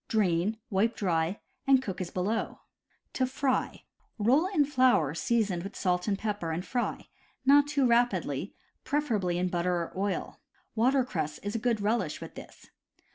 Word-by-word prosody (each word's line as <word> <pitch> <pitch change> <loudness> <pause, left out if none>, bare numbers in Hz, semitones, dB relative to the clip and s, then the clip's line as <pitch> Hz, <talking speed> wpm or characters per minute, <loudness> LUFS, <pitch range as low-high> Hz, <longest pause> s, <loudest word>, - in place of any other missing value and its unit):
Drain, 200 0 +1
wipe 210 +4 +2
dry, 170 -1 0 0.3
and 270 -1 +6
cook 190 -8 -5
as 175 - -3
below: 200 +6 -2 0.5
To 255 - +1
fry: 265 0 -1 0.3
roll 255 - +3
in 330 -7 +2
flour 255 - +3
seasoned 210 -2 0
with 195 +3 -7
salt 180 0 0
and 200 -2 +1
pepper 205 -5 -3
and 165 +3 -3
fry, 245 -2 -3 0.4
not 285 +1 +6
too 290 -2 +1
rapidly, 200 - +1 0.3
preferably 230 -11 0
in 180 +1 0
butter 175 0 0
or 170 -1 -3
oil. 195 +1 -2 0.3
Water 255 +4 +3
cress 155 -9 -3
is 205 +1 -3
a 230 - -1
good 230 -2 0
relish 205 -6 0
with - - -9
them. - - -9
210 Hz, 160 wpm, -29 LUFS, 180-255 Hz, 0.5 s, and